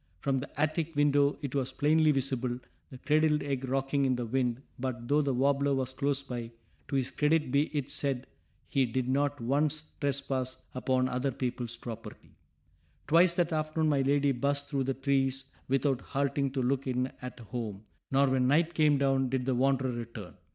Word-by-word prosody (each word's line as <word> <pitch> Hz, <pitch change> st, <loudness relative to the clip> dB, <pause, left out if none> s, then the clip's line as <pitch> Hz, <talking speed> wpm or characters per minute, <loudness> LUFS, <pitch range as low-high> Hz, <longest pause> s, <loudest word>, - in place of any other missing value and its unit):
From 135 Hz, -2 st, 0 dB
the 140 Hz, -, -6 dB
attic 155 Hz, +1 st, 0 dB
window 145 Hz, -1 st, +3 dB
it 140 Hz, -, -3 dB
was 135 Hz, -2 st, -1 dB
plainly 155 Hz, +2 st, +3 dB
visible, 130 Hz, -3 st, -1 dB, 0.3 s
the 130 Hz, -, -10 dB
cradled 150 Hz, +2 st, +2 dB
egg 135 Hz, -2 st, -2 dB
rocking 135 Hz, +1 st, +1 dB
in 130 Hz, -1 st, +2 dB
the 120 Hz, -1 st, -3 dB
wind, 125 Hz, +1 st, -1 dB, 0.2 s
but, 120 Hz, -2 st, -4 dB
though 145 Hz, +3 st, +3 dB
the 140 Hz, -2 st, 0 dB
warbler 140 Hz, +2 st, +2 dB
was 130 Hz, -1 st, -2 dB
close 140 Hz, 0 st, 0 dB
by, 120 Hz, -3 st, -5 dB, 0.4 s
to -, -, -3 dB
his 130 Hz, -2 st, 0 dB
credit 150 Hz, -2 st, +1 dB
be 140 Hz, +2 st, +3 dB
it 145 Hz, -3 st, -3 dB
said 135 Hz, -3 st, -2 dB, 0.4 s
he 135 Hz, -2 st, +2 dB
did 125 Hz, +2 st, -1 dB
not 145 Hz, +2 st, +1 dB
once 150 Hz, +5 st, 0 dB
trespass 135 Hz, -2 st, -2 dB
upon 130 Hz, 0 st, +1 dB
other 125 Hz, +2 st, -1 dB
people's 125 Hz, -3 st, -3 dB
property. 115 Hz, -2 st, -9 dB, 0.7 s
Twice 170 Hz, +2 st, +5 dB
that 175 Hz, -1 st, +1 dB
afternoon 155 Hz, 0 st, 0 dB
my 140 Hz, -2 st, +3 dB
lady 140 Hz, +1 st, +3 dB
buzzed 140 Hz, +3 st, -1 dB
through 135 Hz, -3 st, 0 dB
the 135 Hz, 0 st, -1 dB
trees 135 Hz, 0 st, 0 dB, 0.2 s
without 135 Hz, 0 st, +1 dB
halting 140 Hz, 0 st, -1 dB
to 135 Hz, -2 st, 0 dB
look 135 Hz, +2 st, 0 dB
in 130 Hz, 0 st, 0 dB
at 125 Hz, 0 st, -7 dB
home, 110 Hz, -2 st, -5 dB, 0.3 s
nor 135 Hz, +1 st, +4 dB
when 130 Hz, -1 st, +2 dB
night 160 Hz, +5 st, +3 dB
came 150 Hz, -3 st, +4 dB
down 135 Hz, -1 st, +2 dB
did 130 Hz, -1 st, -1 dB
the 130 Hz, -, +1 dB
wanderer 130 Hz, 0 st, +2 dB
return. 115 Hz, -5 st, -7 dB
135 Hz, 180 wpm, -30 LUFS, 125-145 Hz, 0.7 s, Twice